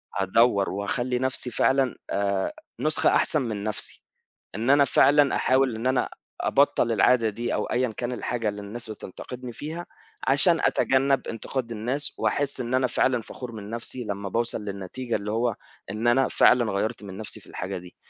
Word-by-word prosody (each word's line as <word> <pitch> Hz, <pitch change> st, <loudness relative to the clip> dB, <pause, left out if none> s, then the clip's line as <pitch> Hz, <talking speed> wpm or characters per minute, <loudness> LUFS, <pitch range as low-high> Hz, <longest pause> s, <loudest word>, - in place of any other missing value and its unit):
هادوّر 100 Hz, +2 st, +3 dB
وهاخلّي 120 Hz, +6 st, -1 dB
نفْسي 130 Hz, -1 st, -1 dB
فعلًا 135 Hz, +1 st, +2 dB
آآ 100 Hz, -1 st, 0 dB, 0.3 s
نسخة 155 Hz, +4 st, +2 dB
أحسن 155 Hz, -, +3 dB
من 110 Hz, -5 st, -3 dB
نفْسي، 105 Hz, -1 st, -4 dB, 0.5 s
إن 115 Hz, +4 st, -1 dB
أنا 140 Hz, 0 st, +6 dB
فعلًا 145 Hz, +1 st, +4 dB
أحاول 130 Hz, -2 st, +2 dB
إن 115 Hz, +3 st, -2 dB
أنا 130 Hz, -1 st, +1 dB, 0.3 s
أبطّل -, -, +2 dB
العادة 120 Hz, -3 st, +4 dB
دي 120 Hz, +3 st, -3 dB
أو 105 Hz, -, 0 dB
أيًا 125 Hz, 0 st, 0 dB
كان 120 Hz, 0 st, -2 dB
الحاجة 120 Hz, -3 st, -2 dB
اللي 105 Hz, 0 st, -6 dB
الناس 110 Hz, +3 st, -7 dB
بتنتقدني 120 Hz, +4 st, -8 dB
فيها، 160 Hz, +7 st, -6 dB, 0.4 s
عشان -, -, +5 dB
أتجنب 135 Hz, +1 st, +2 dB
انتقاد 115 Hz, +1 st, -4 dB
الناس 125 Hz, +7 st, -2 dB
وأحس 140 Hz, -2 st, 0 dB
إن 120 Hz, +1 st, -4 dB
أنا 130 Hz, 0 st, +3 dB
فعلًا 125 Hz, 0 st, +1 dB
فخور 125 Hz, +2 st, -8 dB
من 105 Hz, -2 st, -8 dB
نفْسي 115 Hz, +2 st, -3 dB
لمّا 100 Hz, -1 st, -4 dB
باوصل 115 Hz, 0 st, -1 dB
للنتيجة 100 Hz, +5 st, -4 dB
اللي 105 Hz, 0 st, -3 dB
هو 115 Hz, 0 st, 0 dB, 0.4 s
إن 110 Hz, +3 st, -2 dB
أنا 130 Hz, +2 st, +4 dB
فعلًا 120 Hz, -4 st, +4 dB
غيّرت 110 Hz, +3 st, -2 dB
من 95 Hz, -2 st, -8 dB
نفْسي 110 Hz, 0 st, -3 dB
في -, -, -17 dB
الحاجة 95 Hz, +1 st, -5 dB
دي، 90 Hz, 0 st, -12 dB
120 Hz, 170 wpm, -25 LUFS, 105-130 Hz, 0.5 s, أنا